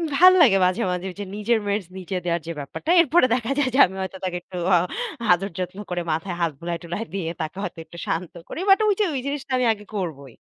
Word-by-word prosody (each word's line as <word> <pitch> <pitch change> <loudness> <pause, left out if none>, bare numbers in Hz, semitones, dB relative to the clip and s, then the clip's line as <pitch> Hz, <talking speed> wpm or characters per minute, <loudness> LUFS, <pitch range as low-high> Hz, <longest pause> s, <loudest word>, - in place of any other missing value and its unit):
ভাল্লাগে 345 - +7
মাঝে, 185 0 +1
মাঝে 180 +1 -3
যে - - -2
নিজের 220 +2 +1
মেডস 200 -3 -1
নিজে 185 0 -4
দেওয়ার 170 -1 0
যে - - -2
ব্যাপারটা 225 - -4
এরপরে 320 -2 +4
দেখা 245 +1 -1
যায় 275 -3 +2
যে - - +3
আমি 190 - -10
হয়তো 190 0 -5
তাকে 180 -1 -2
একটু 180 0 -10 0.2
আ - - +6 0.5
আদর 195 +3 +2
যত্ন 180 +2 -4
করে 175 -1 -1
মাথায় 170 +3 -2
হাত 165 -2 +2
বুলায়-টুলায় 170 +4 -4
দিয়ে 175 -4 -2
তাকে 155 +4 -5
হয়তো 170 -3 -5
একটু 170 - -13
শান্ত 170 +1 -2 0.2
করি - - -5
বাট 390 - +7
ঐযে 415 0 +2
ওই 265 - -1
জিনিসটা 280 -1 -4
আমি 250 - +1
আগে 210 -1 -13
করবই। 140 - -5
190 Hz, 220 wpm, -23 LUFS, 175-250 Hz, 0.5 s, ভাল্লাগে